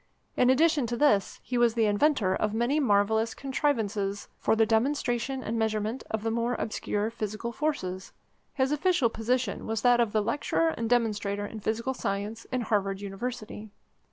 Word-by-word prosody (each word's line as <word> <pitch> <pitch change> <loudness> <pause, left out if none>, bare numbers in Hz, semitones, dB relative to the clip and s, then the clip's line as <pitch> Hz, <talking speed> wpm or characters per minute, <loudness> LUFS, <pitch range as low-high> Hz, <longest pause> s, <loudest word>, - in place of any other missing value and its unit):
In 250 - +4
addition 295 -1 +3
to 240 +1 -3
this, 230 -9 +2
he 250 -1 -2
was 240 -1 +3
the 225 -2 +3
inventor 205 -2 +2
of 215 0 -1
many 240 +6 +1
marvellous 220 -2 +2
contrivances 220 -8 -1
for - - +2
the 225 0 +4
demonstration 245 +2 0
and 225 +1 -2
measurement 220 +2 -1
of 220 -1 -2
the 225 - 0
more 235 +2 0
obscure 215 0 -2
physical 220 +1 -4
forces. 205 -10 -3 0.4
His 265 0 +1
official 300 -4 +2
position 230 0 -1
was 225 -1 -2
that 245 -1 +5
of 225 -3 +1
Lecturer 260 +9 +1
and 230 -8 -3
Demonstrator 210 -4 0
in 220 +2 -7
Physical 225 +5 -1
Science 210 0 -3
in 255 -1 -2
Harvard 200 -3 0
University. 215 +2 -6
225 Hz, 160 wpm, -28 LUFS, 210-255 Hz, 0.4 s, that